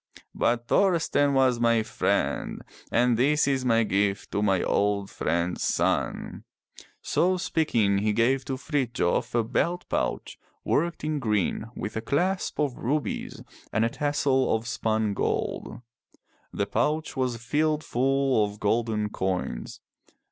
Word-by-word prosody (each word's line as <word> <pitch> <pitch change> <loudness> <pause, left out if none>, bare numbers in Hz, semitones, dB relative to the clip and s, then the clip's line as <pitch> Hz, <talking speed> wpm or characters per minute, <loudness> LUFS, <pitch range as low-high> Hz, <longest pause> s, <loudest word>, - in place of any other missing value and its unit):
But 120 0 0
Thorsten 160 -7 +2
was 130 -3 +3
my 115 -1 +3
friend 110 +1 -1 0.3
and 120 0 +3
this 145 +4 +3
is 135 -2 +1
my 115 -2 +3
gift 100 -1 0
to 105 - -1
my 95 -3 +2
old 100 -1 0
friend's 85 +2 -1
son - - -1 0.2
— - - -18
'' - - -33
So 185 +1 +2
speaking 115 - +1
he 105 +1 +1
gave 120 +5 +2
to 135 -1 -3
Frithjof 130 - -1
a 120 - +3
belt 175 +10 -1
pouch - - -2 0.2
worked 170 +1 0
in 155 -1 -1
green 105 -4 0
with 105 - -5
a 110 - -2
clasp 180 +10 -1
of 145 -4 -1
rubies 145 +5 -2 0.3
and 110 +1 +2
a - - +1
tassel 140 -3 +1
of 110 +1 -4
spun 110 -3 0
gold. 105 - -2 0.7
The - - -1
pouch 155 -1 -1
was 130 -3 -1
filled 150 +6 0
full 135 -2 +2
of 105 0 -4
golden 110 0 0
coins. 95 -11 -3
120 Hz, 140 wpm, -26 LUFS, 105-145 Hz, 0.7 s, was